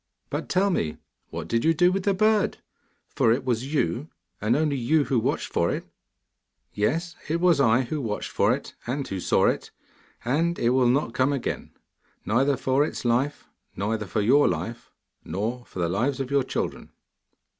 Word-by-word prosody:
But, - - -3
tell 195 +2 +2
me, 80 - -1 0.3
what - - -6
did 115 0 0
you 165 +1 +3
do 175 +3 +4
with 190 0 -2
the 200 -2 +2
bird, 215 +1 +2 0.6
for 115 - +3
it 130 +3 0
was 125 +2 -1
you, 145 -1 0 0.3
and 105 +3 +2
you 150 - +2
only 140 -6 -1 0.2
who 130 -3 +1
watched - - -1
for - - +2
it?' - - -3 0.9
'Yes, 165 +12 -1
it 165 +2 +1
was 175 -4 +4
I 115 -1 +4
who 145 +4 -3
watched 105 -4 -3
for - - +3
it - - -3
and 135 +3 -2
who 95 - -4
saw - - +2
it. - - 0 0.6
And 165 +7 +1
it 120 - +2
will 130 -1 +4
not 125 -2 +1
come 130 +2 +2
again, 140 -4 -3 0.5
neither 130 +5 +2
for 135 +2 +2
its 150 - -4
life, 125 +5 0 0.3
nor 105 +4 -1
for 105 0 -2
your 135 +8 +5
life, 90 +8 -3 0.3
nor 110 +8 -3
for - - -12
the 85 -2 +1
lives 120 +10 0
of 135 0 -3
your 140 -1 +3
children. - - -4
130 Hz, 185 wpm, -25 LUFS, 115-150 Hz, 0.9 s, your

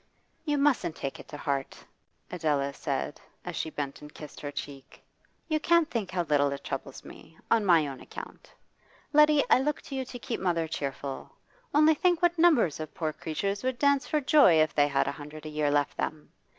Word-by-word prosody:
'You 295 -2 +1
mustn't 280 - +2
take 135 - -5
it - - -12
to 150 - -8
heart,' 140 -2 -3 0.5
Adela 145 -5 0
said - - -3 0.2
as - - -5
she 160 - -2
bent 145 -3 -5
and 150 0 -11
kissed 150 -1 -11
her 145 - -4
cheek. 140 -1 -9 0.4
'You 310 -1 +1
can't 335 0 +3
think 215 -6 -2
how 185 -2 -1
little 145 -3 +2
it 140 0 -6
troubles 135 0 -6
me 160 0 -14
on 225 -2 +4
my 165 -4 +5
own 135 -2 -7
account. - - -10 0.6
Letty, 300 -1 +6
I - - +7
look 295 +2 -1
to 275 - -7
you 265 - -1
to 250 - -8
keep 245 0 -4
mother 170 -3 0
cheerful. 140 -2 -5 0.4
Only 305 +2 +5
think 350 +2 +1
what 350 -1 +3
numbers 285 - +4
of 155 -1 -7
poor 160 -4 -2
creatures 195 +7 -3
would 260 -1 -1
dance 280 0 +2
for 305 - +1
joy 275 - +6
if 155 -1 +3
they 145 -1 +4
had 140 -1 +1
a - - 0
hundred 150 +1 -10
a - - -5
year 150 -1 0
left 145 0 +1
them! 155 -1 -4
160 Hz, 205 wpm, -28 LUFS, -, 0.6 s, I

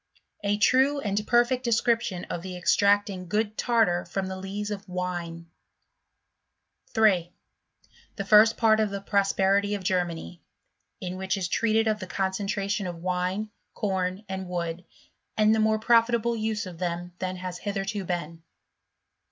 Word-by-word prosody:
A 205 0 +1
true 265 +6 +3
and 210 -3 -2
perfect 240 +1 +3
Description 230 -5 +1
of 170 - -5
the 185 0 -6
extracting 200 +1 +2
i - - -9
good 210 +3 -1
Tartar 225 -9 +2
from 190 +2 -3
the 190 - -4
Lees 200 +2 -5
of 200 -1 -6
Wine. 175 -2 -4 1.4
3. 190 -6 +2 0.8
The 200 - -4
first 215 +2 +6
part 220 -1 +4
of 215 -1 +2
the 200 0 -4
Prosperity 200 0 +1
of 200 - -6
Germany 170 - -2 0.6
• - - -3
in 180 +1 -4
which 190 +1 -1
is 185 -2 -2
treated 225 +3 +1
of 215 -1 +1
the 185 - -6
concentration 195 +1 -2
of 170 -1 -7
wine, 185 +4 -1 0.2
com> 190 -1 -2
and 190 -1 -5
wood, 175 0 -3 0.5
and 215 0 +5
the 220 - +2
more 220 0 +3
profitable 235 +1 +3
use 220 -1 -2
of 175 -3 -9
them 175 0 -3
thaii 185 0 -3
has 180 -1 -6
hitherto 200 0 -3
been. 170 -2 -4
195 Hz, 150 wpm, -26 LUFS, 180-215 Hz, 1.4 s, first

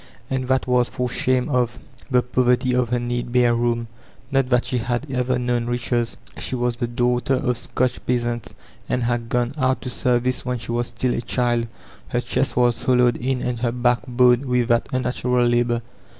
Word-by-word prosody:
And 130 -1 -1
that 130 0 +1
was 125 -1 +2
for 125 -1 -2
shame 125 +1 +1
of 125 -4 0 0.3
the 125 -2 +3
poverty 125 +1 +2
of 125 -2 +1
her 125 0 +1
neat 120 0 -3
bare 120 -1 +4
room. 120 0 0 0.4
Not 135 -2 +2
that 125 -1 +2
she 125 - -1
had 120 +3 -2
ever 125 0 0
known 120 -1 -1
riches. 120 -1 -1 0.2
She - - -2
was 120 -1 -1
the 120 -1 -1
daughter 125 +2 +1
of 125 -1 0
Scotch 125 +1 -2
peasants, 120 -1 -1 0.3
and 125 - 0
had 120 -1 -1
gone 120 +2 0
out 130 0 +1
to 125 - -4
service 125 0 0
when 125 0 -2
she 115 0 -6
was 120 0 -1
st9I 125 -1 -1
a - - -3
child; 120 -1 0 0.4
her - - -1
chest - - -1
was 120 -1 +2
hollowed 125 -2 +3
in 125 0 -2
and 125 -2 -2
her 120 -1 0
back 120 0 +2
bowed 125 +1 +4
with 125 -1 +1
that 120 0 +2
unnatural 125 -1 +1
labor. 120 0 +1
125 Hz, 195 wpm, -22 LUFS, 120-125 Hz, 0.4 s, bare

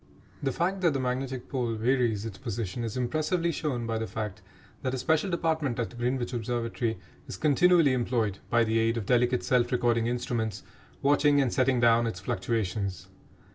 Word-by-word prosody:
The 135 - 0
fact 185 +6 -1
that 170 -4 +3
the 135 - -1
magnetic 130 0 -3
pole 120 -4 -1
varies 115 -2 +1
its 105 -4 -7
position 115 -3 -4
is 115 +1 -4
impressively 155 +7 0
shown 135 -7 -2
by 115 -1 -2
the 110 - -3
fact 105 -3 -5 0.4
that 130 0 -1
a - - -3
special 160 +8 +1
department 160 -7 0
at 120 0 -3
Greenwich 125 +1 -1
Observatory 115 -1 -2 0.3
is - - -6
continually 160 -1 +4
employed, 115 -5 0
by 120 0 +4
the 110 0 +1
aid 115 +1 +1
of 110 - -3
delicate 125 +2 +2
self 125 -2 +2
recording 120 -2 +2
instruments, 120 -3 -2 0.4
watching 145 0 +4
and 135 -4 +1
setting 130 -1 +2
down 115 0 +4
its 90 -6 -4
fluctuations. 95 -2 -2
120 Hz, 175 wpm, -28 LUFS, 115-135 Hz, 0.4 s, continually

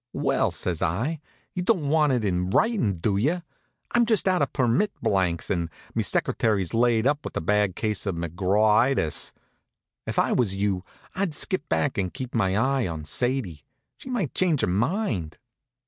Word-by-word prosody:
"Well," - - +1
says 85 -3 -3
I, 120 - -1 0.3
"you 180 - -2
don't 180 -6 +1
want 150 -1 +3
it 120 -4 0
in 90 -1 0
writin', 150 - +2
do 100 +4 0
you? 160 - 0 0.5
I'm 240 -1 +3
just 220 -4 +2
out 185 -4 +3
of 145 - +1
permit 130 - +1
blanks, 90 -4 0
and 85 -3 -1 0.2
me - - 0
secretary's 100 -6 0
laid 115 -1 +3
up 145 +2 +1
with - - -5
a - - +1
bad 105 +2 +1
case 105 -2 -2
of 95 - -1
McGrawitis. 95 - +1 0.8
If - - -4
I - - +3
was 105 -6 +1
you, 100 -2 -1 0.3
I'd 185 -5 -1
skip 165 -1 0
back 135 -6 0
and 90 -2 -1
keep 130 -2 -7
my 95 -4 +1
eye 130 +1 +1
on 80 -3 -5
Sadie. 120 - -1 0.3
She - - -11
might 210 - -2
change 170 -7 +2
her - - +3
mind." 105 - -1
115 Hz, 175 wpm, -25 LUFS, 95-150 Hz, 0.8 s, want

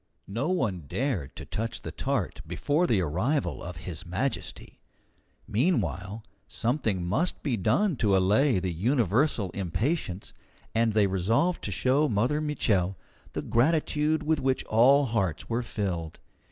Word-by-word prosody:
No 135 - -1
one 105 - -1
dared 115 - -2
to - - -8
touch 115 +4 -4
the - - -5
tart - - -2
before 155 +5 +1
the 105 -5 +2
arrival 95 - -1
of 90 -1 -7
His 85 -4 -5
Majesty. 95 +11 -4 0.7
Meanwhile, 105 - 0 0.2
something 115 - -1
must 165 - -1
be 135 -5 0
done 180 - +2
to 100 -4 +3
allay 105 +7 +3
the 90 -1 -1
universal 115 - +1
impatience, 100 - -2 0.4
and 115 0 +2
they 105 -1 +4
resolved 110 - +1
to - - -3
show 140 +4 +2
Mother 125 +8 +1
Mitchel 100 -11 +1 0.4
the - - -3
gratitude 150 +3 +1
with 155 0 +1
which 130 0 0
all 135 +6 +5
hearts 100 -9 -1
were 115 +2 +1
filled. 90 -8 -3
115 Hz, 140 wpm, -28 LUFS, 95-145 Hz, 0.7 s, all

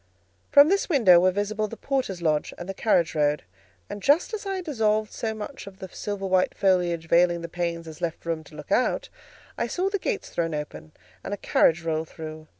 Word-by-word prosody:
From 285 +1 +8
this 395 +1 +1
window 225 - +6
were 185 +1 +4
visible 205 +3 -1
the 230 - -9
porter's 250 -11 -2
lodge 155 -2 0
and 175 - -7
the 195 - -4
carriage 180 -5 +2
road, 150 -1 +1 0.4
and 205 - -7
just 295 - +3
as 415 -2 -4
I 390 - -1
had 370 -2 -5
dissolved 215 -7 0
so 220 -1 -3
much 215 +2 -8
of 195 -1 -11
the 190 -1 -8
silver 200 +1 -5
white 185 -1 +2
foliage 175 -4 +1
veiling 170 0 +3
the 170 - -5
panes 170 -1 -3
as 155 -1 -10
left 170 -1 -3
room 165 -1 -2
to 155 - -15
look 150 +4 -10
out, 250 - +1 0.5
I - - 0
saw 375 +2 -1
the 405 - 0
gates 425 0 -3
thrown 165 -2 -1
open 150 +1 -7 0.3
and 205 - -3
a - - -16
carriage 165 -3 +2
roll 160 -1 -1
through. 155 -1 -9
185 Hz, 215 wpm, -25 LUFS, 165-220 Hz, 0.5 s, From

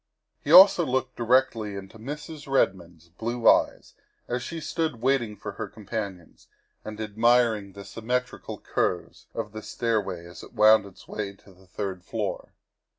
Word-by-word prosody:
He - - -2
also 190 -2 +9
looked 130 -2 -1
directly 120 -3 +1
into 100 +3 -9
Mrs. 145 +3 -7
Redmond's 85 - 0
blue 115 +6 -2
eyes - - +3 0.3
as 120 +1 -2
she 165 +6 -5
stood 160 -5 -2
waiting 120 -4 +1
for - - -7
her - - -5
companions 100 -5 -7 0.4
and 110 0 -8
admiring 110 -1 +2
the 100 0 -10
symmetrical 125 +3 -3
curves - - -2
of 105 - -4
the 110 +1 -7
stairway 105 -8 -2
as 85 -1 -11
it - - -13
wound 110 -1 +6
its 95 - -16
way 100 -2 -4
to 100 0 -19
the 95 +1 -22
third 95 -1 -5
floor. - - -4
110 Hz, 150 wpm, -26 LUFS, 100-125 Hz, 0.4 s, also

